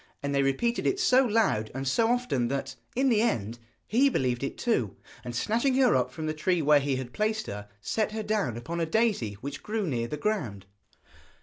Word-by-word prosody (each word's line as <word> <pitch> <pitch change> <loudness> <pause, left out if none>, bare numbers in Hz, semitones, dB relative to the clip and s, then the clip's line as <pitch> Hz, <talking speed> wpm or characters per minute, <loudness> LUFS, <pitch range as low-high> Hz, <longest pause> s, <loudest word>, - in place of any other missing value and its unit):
And 140 0 -1
they 140 - +3
repeated 185 - 0
it 385 - +1
so 260 -6 +5
loud 210 - +1
and 135 0 -3
so 225 - +3
often 245 - +1
that, 135 +1 -3 0.2
in 265 +2 +3
the 220 -3 +3
end, 115 - -1 0.3
he 265 +6 +3
believed 125 - 0
it 140 - -3
too, 125 - 0 0.3
and 120 -1 -6
snatching 235 - +1
her 260 -2 +4
up 125 0 +1
from 160 +2 -6
the 155 - -1
tree 170 +3 0
where 150 -1 +5
he 140 -1 -1
had 130 -1 -5
placed 215 +1 0
her, 105 0 -7
set 215 - -1
her 220 0 -3
down 205 - -1
upon 165 +9 -5
a 165 - 0
daisy 200 - +1
which 140 +1 -6
grew 215 -1 -2
near 120 -7 -1
the 150 - -4
ground. 135 - -2
155 Hz, 210 wpm, -28 LUFS, -, 0.3 s, so